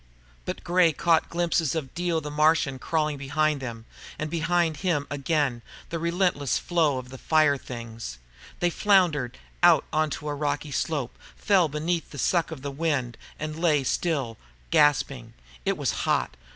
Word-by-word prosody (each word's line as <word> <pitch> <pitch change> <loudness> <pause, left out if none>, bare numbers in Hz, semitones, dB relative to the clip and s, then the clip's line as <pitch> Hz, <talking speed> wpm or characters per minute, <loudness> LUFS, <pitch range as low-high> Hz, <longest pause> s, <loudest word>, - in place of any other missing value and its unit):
But - - -5
Gray 175 -2 +3
caught 165 +2 +2
glimpses 170 -3 0
of 140 -5 -4
Dio 175 -2 0
the 150 -1 -6
Martian 150 -3 +2
crawling 155 0 -1
behind 145 +1 0
them, 115 -3 -6 0.3
and 155 0 -4
behind 170 -1 +1
him 165 -6 0
again, 140 -3 0 0.3
the 165 - -2
relentless 170 -5 +1
flow 160 -6 +1
of 125 0 -7
the 130 0 -10
fire 155 -3 +3
things. 115 - -7 0.4
They 175 0 +2
floundered 170 - +2 0.2
out - - +6
onto 155 -1 -1
a 145 - -1
rocky 145 0 -2
slope, 145 -3 -2 0.2
fell 195 -4 +3
away - - -3
beneath 165 +2 -1
the 145 - -10
suck 170 +4 +1
of 155 -5 -8
the 140 - -3
wind, 140 -5 -1 0.2
and 155 +1 -4
lay 150 -5 +3
still, 135 -6 -1 0.3
gasping. 135 -5 +2 0.3
It 195 -1 +1
was 140 -6 0
hot. - - 0
150 Hz, 160 wpm, -26 LUFS, 135-165 Hz, 0.4 s, out